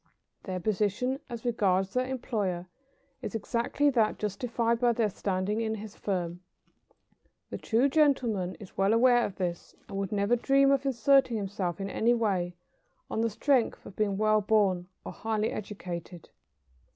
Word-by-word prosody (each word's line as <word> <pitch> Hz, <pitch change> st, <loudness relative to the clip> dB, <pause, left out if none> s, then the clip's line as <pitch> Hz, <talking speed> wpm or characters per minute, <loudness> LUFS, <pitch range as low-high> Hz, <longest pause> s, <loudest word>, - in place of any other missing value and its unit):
Their 185 Hz, -2 st, -3 dB
position, 215 Hz, +7 st, 0 dB
as 235 Hz, 0 st, -7 dB
regards 195 Hz, -5 st, +1 dB
their 255 Hz, 0 st, 0 dB
employer, 210 Hz, -9 st, -2 dB, 0.6 s
is -, -, -5 dB
exactly 235 Hz, +6 st, +1 dB
that 225 Hz, -5 st, +2 dB
justified 230 Hz, +2 st, -1 dB
by 240 Hz, -1 st, +3 dB
their 220 Hz, -3 st, +1 dB
standing 195 Hz, +3 st, -1 dB
in 220 Hz, -1 st, -1 dB
his 215 Hz, 0 st, -9 dB
firm. 175 Hz, -3 st, -3 dB, 1.1 s
The -, -, -4 dB
true 240 Hz, +4 st, +2 dB
gentleman 255 Hz, -, +2 dB
is 200 Hz, -, -13 dB
well 195 Hz, +2 st, +3 dB
aware 240 Hz, +1 st, +5 dB
of 195 Hz, -, -3 dB
this, 175 Hz, -2 st, -4 dB
and 195 Hz, -1 st, -5 dB
would 195 Hz, -1 st, -3 dB
never 205 Hz, +3 st, +2 dB
dream 275 Hz, +3 st, +3 dB
of 275 Hz, 0 st, +1 dB
asserting 265 Hz, -1 st, +3 dB
himself 195 Hz, -3 st, -3 dB
in 195 Hz, -, -3 dB
any 235 Hz, +4 st, +2 dB
way 190 Hz, -6 st, 0 dB, 0.6 s
on 220 Hz, -, 0 dB
the 230 Hz, -, +2 dB
strength 255 Hz, +2 st, +1 dB
of 190 Hz, -, -11 dB
being 205 Hz, -2 st, 0 dB
well 215 Hz, 0 st, +3 dB
born 195 Hz, -4 st, +2 dB, 0.2 s
or -, -, -5 dB
highly 220 Hz, -1 st, -1 dB
educated. 180 Hz, -4 st, -7 dB
215 Hz, 155 wpm, -29 LUFS, 195-240 Hz, 1.1 s, aware